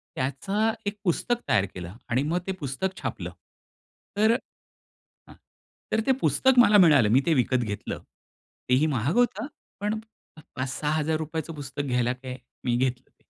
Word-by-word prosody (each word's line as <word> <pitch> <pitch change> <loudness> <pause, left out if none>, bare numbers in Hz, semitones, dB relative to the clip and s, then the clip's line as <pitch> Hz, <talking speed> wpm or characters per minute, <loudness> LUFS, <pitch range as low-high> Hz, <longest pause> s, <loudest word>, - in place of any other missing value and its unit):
त्याचं 195 +12 0
एक 205 +1 -2
पुस्तक 235 +7 +1
तयार 100 - +3
केलं 90 -1 -7 0.2
आणि 125 +4 +2
मग 170 +4 0
ते 190 - 0
पुस्तक 150 +7 -3
छापलं. - - -4 0.9
तर 220 +2 +5
हं. 245 - -8 1.2
तर 220 - +3
ते 265 - +5
पुस्तक 260 -1 +3
मला 210 -4 +7
मिळालं. 145 - +6
मी 130 +5 +5
ते 165 - +4
विकत 130 0 +2
घेतलं. 105 -2 -4 0.7
तेही 135 +5 +4
महाग 140 +2 0
होतं. 240 -1 +2 0.3
पण 210 +1 -1 0.6
₹5,000-6,000चं 155 +4 -2
पुस्तक 145 -1 -5
घ्यायला 125 -3 +1
काय? 130 0 -7 0.3
मी 120 -1 +1
घेतलं 125 0 -1
ते. - - -38
150 Hz, 145 wpm, -26 LUFS, 130-200 Hz, 1.2 s, मला